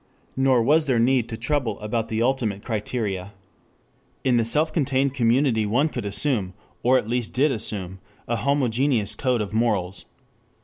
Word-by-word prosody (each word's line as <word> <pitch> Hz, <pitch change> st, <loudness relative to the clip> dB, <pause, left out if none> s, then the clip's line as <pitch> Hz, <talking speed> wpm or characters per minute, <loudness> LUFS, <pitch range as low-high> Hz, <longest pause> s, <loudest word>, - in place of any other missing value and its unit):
Nor 130 Hz, -3 st, +3 dB
was 150 Hz, +5 st, +3 dB
there 130 Hz, -3 st, +2 dB
need 120 Hz, 0 st, +2 dB
to 110 Hz, -, -5 dB
trouble 120 Hz, -3 st, -1 dB
about 110 Hz, +1 st, -2 dB
the 110 Hz, +1 st, -1 dB
ultimate 115 Hz, -6 st, -1 dB
criteria. 105 Hz, -4 st, -3 dB, 0.9 s
In 125 Hz, -2 st, +3 dB
the 115 Hz, -, +3 dB
self 150 Hz, +8 st, +2 dB
contained 135 Hz, -3 st, +1 dB
community 120 Hz, -2 st, +2 dB
one 135 Hz, +9 st, +2 dB
could 120 Hz, -7 st, -5 dB
assume, 100 Hz, -2 st, -1 dB, 0.3 s
or 130 Hz, +2 st, +4 dB
at 105 Hz, -, -2 dB
least 120 Hz, -1 st, -2 dB
did 140 Hz, +3 st, +2 dB
assume, 95 Hz, -5 st, -5 dB, 0.3 s
a 120 Hz, -, -1 dB
homogeneous 130 Hz, -4 st, +1 dB
code 125 Hz, -4 st, 0 dB
of 105 Hz, -1 st, -5 dB
morals. 105 Hz, -5 st, -1 dB
120 Hz, 160 wpm, -23 LUFS, 110-135 Hz, 0.9 s, or